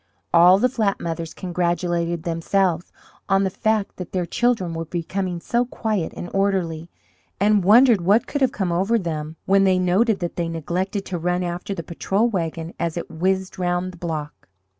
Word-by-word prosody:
All 175 +2 +7
the 250 - +3
flat 220 -6 0
mothers 165 -1 -4
congratulated 175 -1 -1
themselves 170 +1 0 0.4
on 195 0 +3
the 190 - 0
fact 215 0 -1
that 180 - -8
their 180 -2 0
children 220 -4 0
were 165 0 -4
becoming 175 +2 -3
so 240 +7 0
quiet 220 -7 -2
and 175 - -5
orderly, 180 -5 0 0.5
and 205 0 +3
wondered 225 +1 +6
what 200 +6 +3
could 285 - -3
have 260 -2 +3
come 190 -9 -2
over 195 +7 +2
them 160 -5 -4
when 195 0 +4
they 190 -1 +4
noted 190 +5 +2
that 175 -1 -4
they 170 -1 -1
neglected 180 +5 -3
to 180 -2 -4
run 180 +2 0
after 175 +3 -4
the 170 - -5
patrol 195 +7 0
wagon 165 -5 -3
as 170 0 -2
it 170 - -5
whizzed 185 +3 -1
round 175 0 -1
the 180 - -14
block. 155 -4 -5
180 Hz, 180 wpm, -22 LUFS, 170-195 Hz, 0.5 s, All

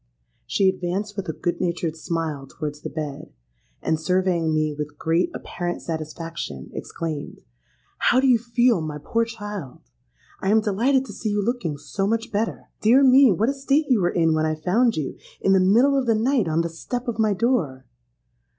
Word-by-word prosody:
She 195 - +2
advanced 190 +3 -1
with 195 -4 -4
a - - -1
good 175 +2 -2
natured 170 -2 -1
smile 160 -4 -3
towards 150 +1 -6
the - - -5
bed, 150 -2 -6 0.5
and, 160 -1 +1
surveying 175 -1 +1
me 155 -1 +1
with 150 0 -6
great 165 +2 +1
apparent 175 0 -4
satisfaction, 160 - -5
exclaimed, 155 -3 -5 0.6
'How 250 - +4
do 265 - +2
you 250 -3 +5
feel, 235 -3 +2
my 155 -1 -4
poor 230 +10 0
child? 205 - -7 0.6
I 190 - 0
am 220 +2 +5
delighted 235 +6 +1
to - - -9
see 220 - -3
you 205 -1 0
looking 220 - -2
so 195 +7 -3
much 225 +1 -1
better! 215 +2 -2
Dear 245 +6 +5
me, 265 -1 +7
what 210 +7 +1
a - - +1
state 280 +2 +1
you 240 -6 +4
were 175 - +2
in 165 -3 +2
when 155 0 +1
I 155 - 0
found 215 +9 +2
you, 150 - -4 0.2
in 195 - +3
the 190 - +5
middle 235 +10 +4
of 265 -3 0
the 225 - +4
night, 235 -2 +2
on 160 +1 +1
the 170 - -2
step 245 +10 -5
of 230 -2 -3
my 215 -2 +3
door.' 180 - 0
185 Hz, 190 wpm, -23 LUFS, 160-230 Hz, 0.6 s, me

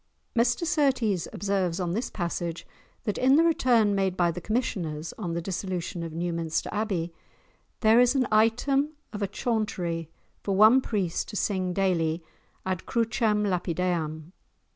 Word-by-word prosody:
[#] - - -46
[#] - - -44
Mr 240 +7 +2
Surtees 260 - +1
observes, 195 -3 -1
on 175 -2 -1
this 230 +5 -2
passage, 170 -2 -3 0.4
that 210 -4 -2
in 265 +2 +5
the 320 - +5
return 245 -10 +3
made 190 -2 0
by 175 -1 +3
the 180 - -6
commissioners, 170 -9 -2
on 175 -6 -4
the 170 - -1
dissolution 185 -1 -3
of 165 -1 -5
Newminster 165 -1 -2
Abbey, 190 -6 -2 0.7
there 220 +1 +6
is 250 +2 +4
an 260 -2 +2
item 270 +7 +2 0.2
of 210 - -5
a 200 - +1
Chauntery, 185 -7 -2 0.3
for 195 - -1
one 220 +6 +7
priest 195 -9 -2
to 210 - -7
sing 190 -3 0
daily 175 -3 0 0.4
ad 185 -2 -3
crucem 225 -2 +1
lapideam. 170 -3 -1
195 Hz, 155 wpm, -27 LUFS, 170-225 Hz, 0.7 s, one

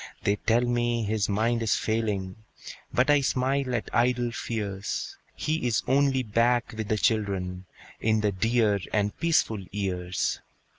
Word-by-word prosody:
They 100 +1 +2
tell 115 +3 +2
me 120 -1 0
his 105 -1 0
mind 115 +3 +1
is 115 - +2
failing, 105 -4 -1 0.5
But 130 +4 +3
I 145 -1 +5
smile 130 0 0
at 115 - -2
idle 120 0 +2
fears; 100 -4 -4 0.2
He 155 -4 -1
is 115 - +1
only 135 0 +2
back 120 +2 +1
with 110 -1 -4
the 110 - +1
children, 95 -4 0 0.3
In 110 -1 +2
the 105 -1 +1
dear 110 +1 +2
and 105 -1 0
peaceful 150 -11 +2
years. 90 -2 -2
110 Hz, 145 wpm, -27 LUFS, 100-120 Hz, 0.5 s, I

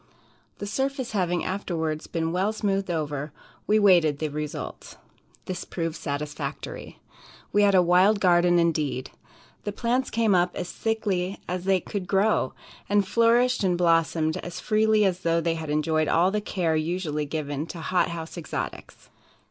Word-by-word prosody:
The 205 - -5
surface 265 +3 -2
having 180 -4 0
afterwards 160 -5 -3
been 165 -1 -2
well 190 +4 +1
smoothed 195 -3 -1
over, 150 -3 -2 0.4
we 215 - +4
waited 175 -8 +5
the 155 +1 -2
result. 150 0 -6 0.5
This 185 - -4
proved 165 -2 -4
satisfactory. 145 -1 -5 0.6
We 205 - +4
had 200 -1 +4
a 180 - +6
wild 185 +4 +4
garden 175 -2 +4
indeed. 155 -6 0 0.5
The 205 - -3
plants 245 +4 0
came 225 -2 +2
up 180 0 +2
as 180 - -4
thickly 200 -4 -1
as 180 0 -3
they 190 -1 +3
could 195 -1 -5
grow, 195 -7 +2 0.4
and 205 -1 +2
flourished 235 +2 +3
and 180 -2 +2
blossomed 165 -2 +2
as 175 - -6
freely 215 0 +3
as 185 -2 +1
though 170 -2 +1
they 165 0 0
had 160 -2 -5
enjoyed 155 +1 +1
all 175 +3 +3
the 210 +1 -1
care 175 -6 -1
usually 155 -2 -2
given 145 0 -3
to 170 - -7
hot 180 +3 +1
house 170 +1 -6
exotics. 155 - -6
175 Hz, 155 wpm, -26 LUFS, 160-200 Hz, 0.6 s, a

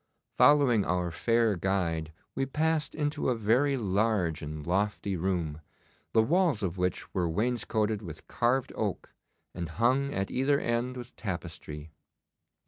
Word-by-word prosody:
Following 140 -8 +5
our 90 -1 0
fair 115 +4 +2
guide 85 -4 -1 0.2
we 135 - -1
passed 155 +1 0
into 145 -3 -1
a 125 - +2
very 125 +6 +2
large 100 - +1
and 75 -1 -6
lofty 100 +2 0
room, 85 -4 -2 0.5
the 110 - +4
walls 165 - +2
of 90 -2 -1
which 90 -1 -2
were 90 -3 0
wainscoted 110 +1 0
with 80 -6 -9
carved 125 +2 0
oak, - - -3 0.4
and 85 -2 -4
hung 125 - +1
at 95 -6 -2
either 140 +2 +2
end 120 +2 -1
with 120 0 -9
tapestry. 80 -5 -6
105 Hz, 135 wpm, -29 LUFS, 85-125 Hz, 0.5 s, Following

